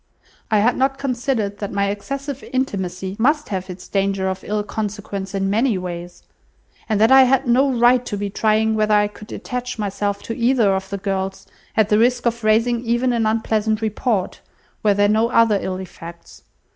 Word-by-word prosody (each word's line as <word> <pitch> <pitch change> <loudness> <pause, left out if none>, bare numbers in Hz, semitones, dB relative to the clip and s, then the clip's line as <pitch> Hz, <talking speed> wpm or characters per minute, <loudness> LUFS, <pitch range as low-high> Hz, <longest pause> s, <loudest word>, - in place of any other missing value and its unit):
I 215 - +3
had 240 +4 +2
not 270 +1 +1
considered 240 -6 -2
that 205 - -4
my 200 0 0
excessive 275 +6 -5
intimacy 190 -7 -2
must 295 +5 +2
have 190 -1 -4
its 180 0 -9
danger 195 -1 0
of 190 - -5
ill 210 0 -2
consequence 205 -2 -5
in 195 0 0
many 220 +2 +1
ways; 175 -1 -7 0.7
and 215 -2 +1
that 220 +4 +4
I 265 0 +9
had 265 +1 +2
no 265 +3 +3
right 245 0 +4
to 205 - -3
be 205 0 -2
trying 220 +1 +2
whether 215 -1 +2
I 205 0 +3
could 210 +1 -13
attach 250 0 -5
myself 200 -1 -2
to 230 - -5
either 235 -4 +3
of 190 0 -3
the 200 - -3
girls, 190 -1 -3 0.3
at 215 -1 +3
the 210 - +4
risk 245 +1 +2
of 235 -1 -1
raising 230 +2 +2
even 240 +1 +1
an 225 -2 +1
unpleasant 220 -1 0
report, 215 -2 -1 0.4
were 205 -2 +3
there 205 0 +3
no 220 +2 +2
other 230 -4 +4
ill 185 -1 -3
effects. 170 -2 -11
215 Hz, 185 wpm, -20 LUFS, 200-240 Hz, 0.7 s, I